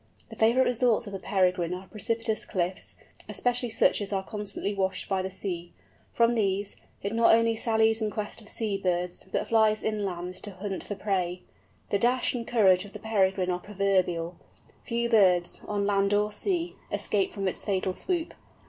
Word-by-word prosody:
The - - -9
favourite 235 +4 +4
resorts 240 -1 +2
of 200 - -8
the 195 - -4
Peregrine 180 -3 +1
are 185 +1 -9
precipitous 225 +1 -2
cliffs, 185 -1 -3 0.3
especially 245 0 +1
such 215 - +3
as 205 - -4
are 195 -1 -1
constantly 205 -1 -3
washed 190 -1 -1
by 190 -1 0
the 190 - -3
sea. 180 -2 -5 0.4
From 235 0 +3
these, 200 -3 0 0.3
it 200 +2 -2
not 230 0 +6
only 230 0 +2
sallies 220 0 +2
in 215 - 0
quest 210 +1 -5
of 210 - -13
sea 210 -3 -2
birds, 180 0 -2
but - - -1
flies 220 -1 +3
inland 190 -5 -2
to 205 - -7
hunt 195 0 -5
for 205 - -5
prey. 185 -3 -2 0.5
The 200 - +2
dash 245 +3 +2
and 235 -2 -4
courage 190 -6 +4
of 205 - -12
the - - -6
Peregrine 190 -4 +1
are 180 - -1
proverbial, 185 -4 0 0.5
few 235 -1 -1
birds, 185 -6 +3
on 205 -1 -1
land 200 0 +2
or 210 +1 +1
sea, 345 - -2
escaping 200 -2 +1
from 195 -1 -1
its 185 - -3
fatal 190 -2 0
swoop. 345 - -2
205 Hz, 180 wpm, -28 LUFS, 190-225 Hz, 0.5 s, not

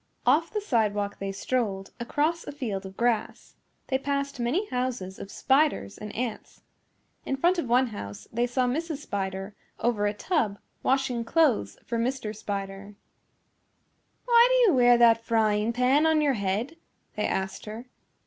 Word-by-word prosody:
Off 330 +2 +3
the 425 - -1
sidewalk 210 - 0
they 195 0 -3
strolled, 195 -2 -2
across 300 +7 0
a - - -4
field 215 -9 -4
of 190 - -13
grass. 235 -2 -1 0.4
They 265 - +1
passed 280 0 -2
many 255 - 0
houses 250 -7 -3
of 195 - -8
spiders 270 - +1
and 210 0 -8
ants. 235 -2 -5 0.6
In 270 - -2
front 350 +5 +2
of 320 - -2
one 250 +2 +4
house 105 - -8
they 240 +2 +1
saw 250 +1 +1
Mrs. 310 +5 -2
Spider 195 -6 -4 0.3
over 220 -3 +1
a 205 - -1
tub 225 - 0 0.2
washing 265 -3 +1
clothes 230 - +2
for 235 - -2
Mr. 230 -3 -2
Spider. 200 0 -5 1.3
"Why 475 -1 +6
do - - +5
you - - +2
wear 245 -1 +6
that 230 -1 +5
frying 220 -1 +2
pan 255 +6 +3
on 320 -1 +3
your 290 -2 +2
head?" 215 +8 -2 0.4
they 210 - 0
asked 190 0 -3
her. 220 +3 -7
235 Hz, 160 wpm, -27 LUFS, 205-280 Hz, 1.3 s, Why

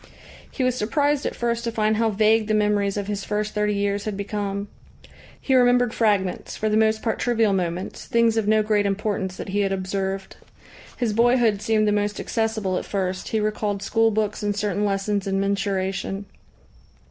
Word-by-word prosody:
He 260 - -3
was 255 0 +2
surprised 285 +6 0
at - - -4
first 235 0 -1
to 235 - -2
find 215 -1 +1
how 225 0 +2
vague 215 +1 +3
the 215 - +1
memories 210 -1 +1
of 200 - -2
his 200 -1 -3
first 210 0 -2
thirty 210 0 0
years 200 0 -1
had 210 -2 -3
become. 200 0 -3 0.7
He 265 - -1
remembered 245 -2 +4
fragments, 200 -5 0
for 215 - 0
the 210 - +1
most 220 0 +2
part 225 - -1
trivial 225 -4 +2
moments, 180 -1 -3
things 230 -1 +3
of 220 -2 0
no 215 0 +4
great 210 -1 +2
importance 195 -2 -2
that - - -6
he 200 +2 -1
had 195 -1 +1
observed. 195 0 -3 0.6
His 235 -4 0
boyhood 235 -2 +3
seemed 215 -1 +2
the - - +3
most 205 0 -1
accessible 220 -5 -1
at - - -8
first, 185 -2 -2
he 220 - 0
recalled 210 -1 -1
school 225 +2 +2
books 215 -1 -1
and 205 -1 -1
certain 205 0 0
lessons 200 0 -1
in 195 0 0
mensuration. 195 0 -1
210 Hz, 185 wpm, -23 LUFS, 200-220 Hz, 0.7 s, remembered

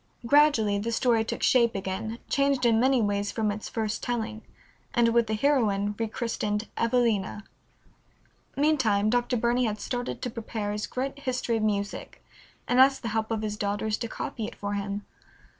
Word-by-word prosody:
Gradually 235 -7 +4
the 230 +3 -2
story 230 -1 +2
took 225 - -4
shape 235 -3 +4
again, 195 +4 -3
changed 275 -2 +1
in 225 -1 +4
many 260 -1 +3
ways 205 0 0
from 215 -2 0
its 210 +1 -6
first 220 -2 -2
telling, 225 -2 -3 0.5
and 235 -1 +4
with 235 0 +3
the 220 - 0
heroine 210 -6 +2
rechristened 220 -2 -2
Evelina. 230 -4 +1 1.1
Meantime 250 -9 +2
Dr. 245 0 +1
Burney 240 +2 +2
had 215 -2 -2
started 245 +2 -3
to 245 - -2
prepare 220 -3 -4
his 210 +1 -3
great 270 +2 -4
History 255 -4 -1
of - - -2
Music, 205 -1 -3 0.4
and 245 - +2
asked 270 0 +5
the 230 - -2
help 220 0 -1
of 220 -1 -2
his 210 -1 -3
daughters 205 +1 -1
to 230 - -3
copy 220 0 -5
it - - -9
for 205 0 -4
him. 200 0 -3
225 Hz, 170 wpm, -27 LUFS, 210-245 Hz, 1.1 s, asked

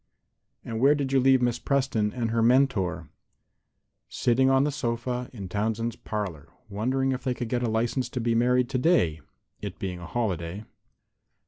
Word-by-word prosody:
"And 110 -1 -4
where 140 +4 +5
did 135 -2 -2
you 135 - +5
leave 130 -1 +4
Miss 120 -1 +1
Preston 130 -7 0
and 115 -2 -2
her 115 0 +1
mentor?" 115 - +2 1.0
"Sitting 130 +2 +2
on 135 0 +4
the 150 - +1
sofa 125 -1 -3
in 100 -6 -7
Townsend's 110 +4 -2
parlor, 105 -10 -5 0.2
wondering 130 +6 0
if 130 -1 -3
they 130 -2 -1
could 120 -2 -4
get 120 0 0
a 120 - 0
license 120 +3 0
to 125 - -4
be 115 0 +1
married 125 +2 +3
today, 125 - +2 0.4
it - - -6
being 90 -2 -4
a 85 - -8
holiday." 100 -3 -3
120 Hz, 165 wpm, -26 LUFS, 105-130 Hz, 1.0 s, where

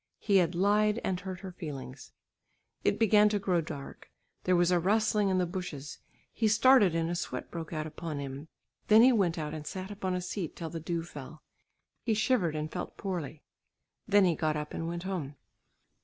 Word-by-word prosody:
He 200 -2 +2
had 175 -2 +2
lied 210 +4 +3
and 185 -2 -1
hurt 185 -1 -7
her 190 -2 -7
feelings. 145 -6 -8 0.7
It - - +2
began 210 -1 +5
to 210 - +1
grow 185 -4 +1
dark. 140 -3 -8 0.4
There 185 - +4
was 175 0 +3
a 180 - +4
rustling 210 +2 +2
in 190 - +2
the 180 - +2
bushes; 170 -6 -6 0.3
he 220 - +1
started 215 -4 +5
and 165 0 +1
a 170 - -2
sweat 175 - -4
broke 165 -2 -6
out 155 -2 -3
upon 155 0 -5
him. 140 +2 -6 0.4
Then 215 +2 +7
he 260 - +7
went 190 -8 +2
out 150 -1 -3
and 155 -1 -6
sat 190 +1 -5
upon 190 -2 -2
a 180 - -2
seat 180 -2 -4
till 165 -2 -6
the 165 - -4
dew 165 +1 -3
fell. 150 -1 -10 0.6
He 225 -3 0
shivered 210 -8 +1
and 155 +1 -3
felt 180 - -6
poorly. 165 -6 -4 0.6
Then 205 -2 +5
he 175 - +3
got 155 -1 0
up 150 0 -5
and 165 - -3
went 170 +1 -4
home. 170 -7 -4
175 Hz, 200 wpm, -30 LUFS, 160-200 Hz, 0.7 s, Then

